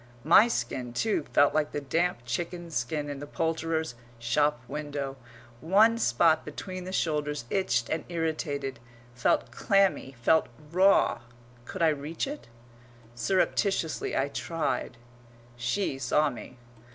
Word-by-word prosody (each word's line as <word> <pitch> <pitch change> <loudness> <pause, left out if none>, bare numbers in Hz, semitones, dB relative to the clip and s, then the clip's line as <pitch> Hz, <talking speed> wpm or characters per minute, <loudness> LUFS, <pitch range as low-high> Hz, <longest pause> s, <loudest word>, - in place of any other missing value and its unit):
My 175 +9 +7
skin, 125 - -3
too, 160 - 0
felt 145 - +4
like 155 -1 0
the - - -1
damp 160 -2 -1
chicken's 170 +6 -4
skin 145 +5 -1
in 145 -1 -5
the 145 - -7
poulterer's 160 -2 -1 0.2
shop 145 +4 +1
window; 145 -1 -4 0.4
one 215 - +4
spot 160 - +3
between 185 -1 -7
the 185 - -5
shoulders 150 -7 -1
itched 120 -12 +1
and 160 - -2
irritated, 155 -5 -2 0.3
felt 120 0 +1
clammy, 195 -3 +1
felt 160 +7 +3 0.2
raw. 190 +3 +4 0.5
Could 180 +5 -3
I 165 - +6
reach 150 +2 -2
it? 290 +2 -7 0.7
Surreptitiously 185 - 0
I 135 +1 +1
tried. 165 -5 -2 0.6
She 135 +5 -1
saw 145 +3 +2
me. 125 +1 -10
155 Hz, 130 wpm, -28 LUFS, 135-175 Hz, 0.7 s, My